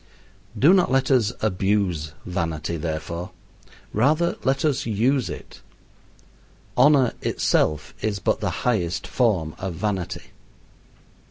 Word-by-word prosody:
Do 145 - +6
not 185 -2 +4
let 135 +1 +2
us 120 -5 +3
abuse 95 -6 0
vanity, 85 -3 -2
therefore. 85 +2 -4 0.6
Rather 155 +10 +2
let 135 +3 +1
us 140 -4 0
use 120 +4 +1
it. - - -9 1.1
Honor 135 -1 +5
itself 75 0 0
is 105 -2 -1
but - - 0
the - - -1 0.2
highest 95 -8 0
form 95 -11 +1
of 95 -3 -4
vanity. 95 -1 -3
105 Hz, 110 wpm, -23 LUFS, 85-130 Hz, 1.1 s, Do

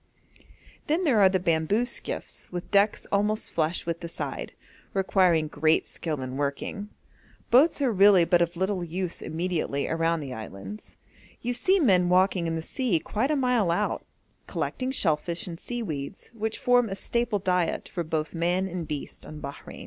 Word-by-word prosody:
Then 320 +5 +1
there 265 -10 +3
are 195 -2 +7
the 190 0 +1
bamboo 170 +6 +1
skiffs - - -4
with 175 0 -6
decks 200 +1 +3
almost 210 +2 0
flush 160 +1 0
with 170 0 -2
the 170 - -6
side, 165 - -5 0.4
requiring 185 -4 +3
great 155 +1 +2
skill 155 -5 -4
in 130 +1 -5
working. 145 +8 -3 0.6
Boats 285 +4 +5
are 255 - +3
really 195 -3 +6
of - - -4
but 170 -1 +3
little 190 +1 -1
use 175 +1 -4
immediately 160 -4 -2
around 165 0 0
the 135 -3 -6
islands. 100 -2 -9 0.5
You 245 - 0
see 380 +10 +3
men 185 - +4
walking 185 -1 +3
in 165 - -1
the 160 - -3
sea 240 -2 0
quite 220 - -1
a 305 - +2
mile 250 -8 +2
out, 205 +5 0 0.4
collecting 255 0 -2
shellfish 170 - 0
and 170 -2 -7
seaweeds, 195 - -5
which 220 -1 -3
form 245 -3 +3
a 195 - -3
staple 235 +2 0
diet 180 -3 0
for 175 - -3
both 155 -1 -2
man 175 +3 +1
and 175 -3 -5
beast 150 -2 -6
on 155 - -8
Bahrein. 140 -1 -8
180 Hz, 170 wpm, -27 LUFS, 165-210 Hz, 0.6 s, are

